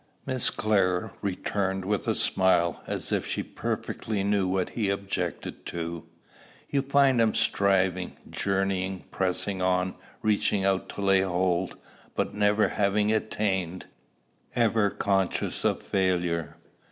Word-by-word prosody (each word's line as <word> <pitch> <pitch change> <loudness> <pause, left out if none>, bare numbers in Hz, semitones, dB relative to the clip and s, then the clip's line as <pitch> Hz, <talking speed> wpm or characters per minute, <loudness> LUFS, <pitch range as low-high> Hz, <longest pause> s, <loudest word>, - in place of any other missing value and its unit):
Miss 130 -3 +2
Clare 95 -4 +1
returned 95 -1 -1
with 105 -1 -1
a - - +2
smile, 90 -3 +2
as - - -3
if - - +1
she - - -1
perfectly 105 -3 -3
knew 100 -1 +2
what 95 0 0
he 105 -4 -1
objected 100 -3 -3
to. 85 -1 -4 0.7
"You 140 - +2
find 135 -2 +4
him 110 -1 +2
striving, 95 -2 +2
journeying, 95 -1 -1
pressing 95 +1 -1
on, 90 0 +1 0.3
reaching 105 -2 +2
out 95 -1 +1
to - - -6
lay 95 -1 +4
hold, 90 -1 0 0.4
but - - -1
never 105 +1 +3
having 105 +1 +2
attained, 95 -5 -1 0.7
ever 110 -3 +3
conscious 95 -2 0
of - - +1
failure." 90 -4 0
95 Hz, 125 wpm, -27 LUFS, 90-105 Hz, 0.7 s, find